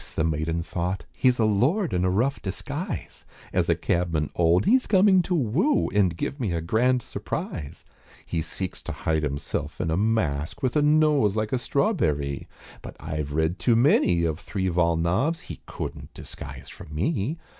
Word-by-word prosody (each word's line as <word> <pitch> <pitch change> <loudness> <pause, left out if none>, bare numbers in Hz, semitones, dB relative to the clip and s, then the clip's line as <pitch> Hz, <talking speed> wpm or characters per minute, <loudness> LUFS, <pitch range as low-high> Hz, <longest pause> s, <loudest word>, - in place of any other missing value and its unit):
the - - +1
maiden 80 +1 -1
thought 90 +2 -3
"He's 125 -1 +2
a 110 - +3
lord 140 - +2
in 90 0 +1
a 90 - +2
rough 120 +9 0
disguise, 95 -2 -5 0.3
As - - +1
a - - +4
cabman 85 -4 -1
old 85 +2 +3
he's 255 +3 +4
coming 190 -1 +5
to 180 +1 -1
woo 160 - +1
And 95 -5 +2
give 140 - -3
me 105 -9 -1
a 85 - 0
grand 120 +9 +1
surprise; 75 -4 -5 0.4
He 85 - -2
seeks 90 +3 -4
to - - -6
hide 80 -1 -1
himself 70 0 -3
in 85 -3 -1
a 80 - +1
mask, 95 - 0
With 130 +1 0
a 150 - +4
nose 150 -8 +3
like 110 +1 -1
a 130 - +2
strawberrie, 75 - 0 0.3
But - - -9
I've 75 -2 -4
read 80 +4 0
too 120 - +3
many 115 - +4
of 80 0 -1
three 95 -2 -2
vol. 85 -1 +2
novs., 95 - +1
He - - -9
couldn't - - -6
disguise - - -8
from 75 - -11
me. 120 - -1
95 Hz, 175 wpm, -25 LUFS, 80-130 Hz, 0.4 s, coming